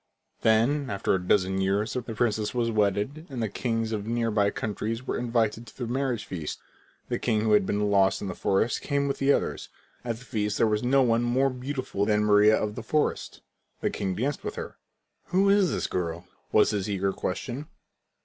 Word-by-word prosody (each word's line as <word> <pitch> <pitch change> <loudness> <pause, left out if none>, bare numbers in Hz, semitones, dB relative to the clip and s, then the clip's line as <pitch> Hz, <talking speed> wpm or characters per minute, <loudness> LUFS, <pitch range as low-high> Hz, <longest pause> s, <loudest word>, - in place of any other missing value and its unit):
When, 125 +6 +3
after 100 -3 0
a 95 - +1
dozen 95 +1 +2
years, 100 +3 0
the 125 - -1
princess 110 -1 -1
was 115 -1 +1
wedded, 105 - 0
all 135 - -7
the 115 -2 0
kings 115 +1 -2
of 105 -1 -3
near 115 0 0
by 100 -1 +3
countries 110 +4 -3
were - - -2
invited 115 -1 0
to - - -15
the 125 - -3
marriage 125 -1 -1
feast. 80 -5 -5 0.5
The - - -1
king 110 -3 +1
who 110 0 +1
had 105 -2 +4
been 105 0 0
lost 95 -1 +3
in 100 - -5
the 90 - -3
forest 100 +6 0
came 140 -1 0
with 140 - -2
the 135 +1 +3
others. - - -1 0.3
At 115 -2 -3
the 125 - -14
feast 105 -2 -1
there - - +4
was 105 -1 +1
no 135 +2 +3
one 115 -1 +2
more 130 +3 +2
beautiful 125 -5 -3
than 105 -1 +2
Maria 105 +1 +6
of 105 -1 -2
the 120 - -6
forest. 150 +7 -1 0.4
The - - 0
king 95 -2 -2
danced 135 +8 -2
with - - -4
her. - - -6 0.5
"Who 195 +2 +3
is 200 -3 +4
the - - -1
girl?" 85 -1 -3 0.3
was 105 - +4
his 105 -1 -2
eager 95 -1 0
question. 125 +10 -4
110 Hz, 205 wpm, -27 LUFS, 105-125 Hz, 0.5 s, Maria